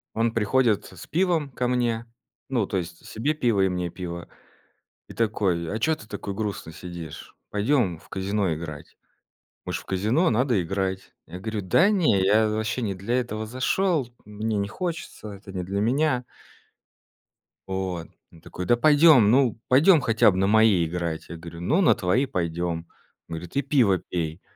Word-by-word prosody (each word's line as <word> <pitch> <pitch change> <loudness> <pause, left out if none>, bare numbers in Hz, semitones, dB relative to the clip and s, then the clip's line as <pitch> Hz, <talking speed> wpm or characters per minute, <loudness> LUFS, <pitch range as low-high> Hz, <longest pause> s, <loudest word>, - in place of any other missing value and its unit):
Он 115 0 +1
приходит 115 0 +2
с 95 -2 -11
пивом 170 -4 +1
ко 125 0 -1
мне. 120 -2 0 0.4
Ну, 120 -6 +1
то 95 - -2
есть 85 -1 -6
себе 135 +8 -1
пиво 120 -9 +1
и 95 - +3
мне 90 -1 -2
пиво. 85 -1 -7 0.8
И - - -9
такой: 100 -7 0
"А 110 - -2
чё 160 +7 +2
ты 105 - -14
такой 100 -1 -5
грустный 100 -6 -4
сидишь? 85 -3 -9
Пойдем 105 - +1
в - - -20
казино 95 -2 -1
играть. 75 -2 -8 0.7
Мы - - -4
ж - - -1
в - - -12
казино, 110 - +1
надо 120 -2 +2
играть". 95 +1 -3
Я 90 - -7
говорю: 110 +2 -3
"Да 165 - +4
не, 165 - +3
я 110 +3 +4
вообще 110 +4 -2
не 100 -4 -1
для 115 +7 0
этого 110 -3 -4
зашел, 135 - 0 0.2
мне 105 +1 -3
не 100 - 0
хочется, 165 - -5
это 100 0 -12
не 90 -1 -3
для 100 +3 -2
меня". 125 +3 +1 1.4
Вот. 95 -3 -3 0.2
Он 80 - -17
такой: 90 +3 -7
"Да 120 - +3
пойдем, 145 -5 +6
ну, 125 -4 +3
пойдем 155 +7 +6
хотя 115 -3 +4
б 90 - -3
на 95 - +2
мои 105 -4 +4
играть". 85 -1 -4
Я 85 - -7
говорю: 85 +1 -10
"Ну, 155 - +2
на 175 - +5
твои 100 +10 +1
пойдем". 85 -4 -2 0.4
Он - - -5
говорит: 85 +7 -9
"И 140 - +3
пиво 120 -10 +3
пей". 85 -1 -4
105 Hz, 175 wpm, -25 LUFS, 90-125 Hz, 1.4 s, пойдем